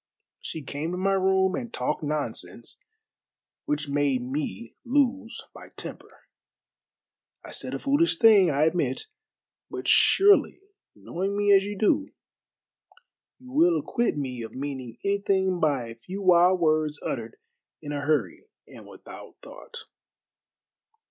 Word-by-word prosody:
She 160 - -7
came 145 +4 -4
to - - -3
my 195 +2 +1
room 190 0 +2
and 235 +3 -4
talked 125 +4 -2
nonsense, 150 -1 -4 0.9
which 150 0 -2
made 140 -3 0
me 125 -5 -5
lose 260 -2 0
my - - -13
temper. - - -9 1.2
I - - -10
said - - -3
a - - -1
foolish 300 +5 +2
thing, 210 - +6
I 145 0 +1
admit, 155 -5 0 0.7
but - - -6
surely 400 +1 +5 0.4
knowing 195 +3 -4
me 205 0 +2
as 195 0 +3
you 205 0 -5
do 285 +9 +1 1.3
you 255 0 -15
will 335 +5 +4
acquit 235 -9 -1
me 130 -4 -4
of 110 - -8
meaning 130 -4 -6
anything 195 -2 +1
by 140 -7 0
a 115 - -9
few 185 - -8
wild 180 0 +5
words 155 -2 +1
uttered - - -5 0.4
in 145 -2 -7
a 145 -1 -3
hurry 155 - -1 0.2
and - - -14
without - - -12
thought." 480 -2 -11
180 Hz, 135 wpm, -26 LUFS, 145-210 Hz, 1.3 s, thing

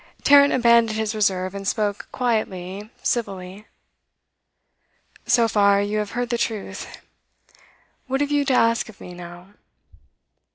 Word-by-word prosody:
Tarrant 285 0 +6
abandoned 235 -3 +3
his 220 0 -1
reserve, 190 -3 0
and 200 0 -6
spoke 205 -1 -1
quietly, 205 -5 -3
civilly. 200 -3 -3 1.6
'So 235 -2 +4
far, 200 -2 +3
you 205 +1 -1
have 210 -1 -4
heard 245 0 -2
the 235 - -1
truth. 220 -3 -4 1.2
What 265 +1 -1
have 290 0 -1
you 290 -1 +2
to 270 - +1
ask 230 -2 +2
of 220 - -15
me, 180 - -10
now? 175 +1 -11
215 Hz, 130 wpm, -22 LUFS, 195-235 Hz, 1.6 s, Tarrant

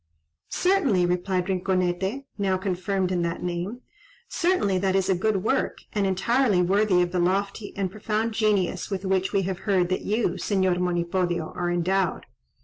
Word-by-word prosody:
"Certainly," 290 - +2
replied 180 +1 0
Rinconete 190 +5 -1
(now 195 -3 0
confirmed 185 0 -1
in 180 -1 0
that 170 0 -2
name), 180 +7 -3 0.5
"certainly 335 - +1
that 190 0 +1
is 190 0 +1
a - - +5
good 195 +1 0
work, - - 0 0.2
and 205 -2 +1
entirely 205 +2 +2
worthy 185 0 +3
of 175 - -3
the 180 - 0
lofty 200 +3 -1
and 190 -2 -1
profound 215 +2 -2
genius 205 -5 0
with 195 -1 -3
which 190 0 +1
we 195 -2 +1
have 190 0 -3
heard 180 -3 +3
that 185 - -1
you, 220 +3 0
Señor 190 -3 +1
Monipodio, 175 -1 -1
are 175 -1 -1
endowed. 180 +1 0
190 Hz, 160 wpm, -25 LUFS, 180-205 Hz, 0.5 s, a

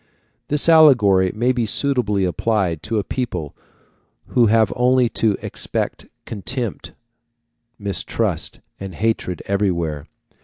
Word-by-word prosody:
This 150 +2 +2
allegory 115 - +5
may 120 +4 +2
be 120 -3 -1
suitably 105 -6 0
applied 90 -3 -1
to 115 0 -3
a 105 - 0
people 90 - -4 0.7
who 120 -2 +3
have 110 -1 +3
only 125 0 +3
to 110 -3 0
expect - - -4 0.2
contempt, 115 +2 -4 0.8
mistrust, 100 -1 -2 0.2
and 95 -3 -7
hatred, 110 -4 -2
everywhere. 85 -7 -1
110 Hz, 110 wpm, -20 LUFS, 95-125 Hz, 0.8 s, allegory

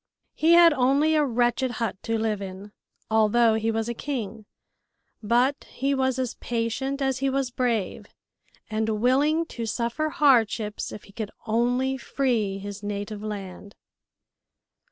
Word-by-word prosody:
He 325 +2 +3
had 340 -1 +8
only 280 +4 +3
a 305 -1 +3
wretched 245 0 +1
hut 230 -6 -2
to 225 -1 -1
live 220 -2 -1
in, 195 +1 -8 0.4
although 220 +1 +4
he 220 +1 0
was 225 0 -1
a 235 - -2
king, 225 -5 -5 0.7
but 245 +6 +1
he 275 +2 -1
was 260 -1 +1
as 255 -2 -2
patient 250 +4 -2
as 265 -1 0
he 275 0 +1
was 270 -1 -1
brave, 235 -6 -1 0.6
and 220 0 -1
willing 290 +7 +2
to 230 -8 -6
suffer 235 +7 -1
hardships 230 -8 +2
if 210 - -9
he - - -16
could 215 -1 -4 0.2
only 245 +4 +1
free 235 -7 -1
his 200 +1 -7
native 205 0 -5
land. 200 -2 -7
235 Hz, 145 wpm, -25 LUFS, 215-265 Hz, 0.7 s, had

